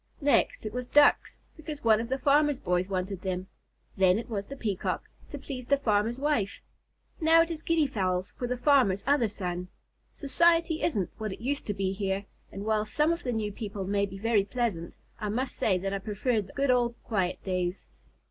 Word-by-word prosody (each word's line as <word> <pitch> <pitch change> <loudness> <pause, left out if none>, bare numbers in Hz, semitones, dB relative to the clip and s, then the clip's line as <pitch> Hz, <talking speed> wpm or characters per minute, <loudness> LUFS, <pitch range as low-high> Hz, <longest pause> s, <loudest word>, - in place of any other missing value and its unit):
Next 285 -5 +2
it 215 - -4
was 250 0 -4
Ducks, 290 +2 +4 0.2
because 305 -2 -8
one 220 -1 +4
of 230 - -6
the 265 - 0
farmer's 290 +1 +3
boys 180 -3 -1
wanted 190 0 -3
them. 185 -1 -3 0.5
Then 190 -1 +4
it 230 - -5
was 200 -2 -3
the 275 - -7
Peacock, 210 -8 -2 0.3
to 290 - -6
please 260 -3 -7
the 280 - +4
farmer's 225 -2 +1
wife. 270 -8 0 0.6
Now 325 0 +6
it 335 - -6
is 320 -1 -5
Guinea 330 -2 +2
Fowls 185 -7 -1
for 245 - -4
the 250 +1 -2
farmer's 245 -8 +3
other 280 -4 +3
son. 180 -3 -4 0.4
Society 330 +2 +2
isn't 205 - 0
what 215 -2 -3
it - - -10
used 275 +5 -2
to 205 - -2
be 195 -1 -1
here, 195 0 -2 0.3
and 200 +1 -6
while 215 -1 +2
some 300 +9 +1
of 335 - -5
the 250 - -2
new 215 -3 -2
people 205 -2 -5
may 200 +1 +1
be 195 0 -9
very 220 0 +2
pleasant, 205 -7 -3 0.2
I 210 -2 -3
must 250 +5 -2
say 190 -4 +2
that 195 +2 -3
I 195 - -1
preferred 210 +1 -1
the - - -14
good 275 -1 +2
old 240 -1 +2
quiet 190 -5 -1
days." 185 -1 -2
220 Hz, 205 wpm, -28 LUFS, 195-275 Hz, 0.6 s, Now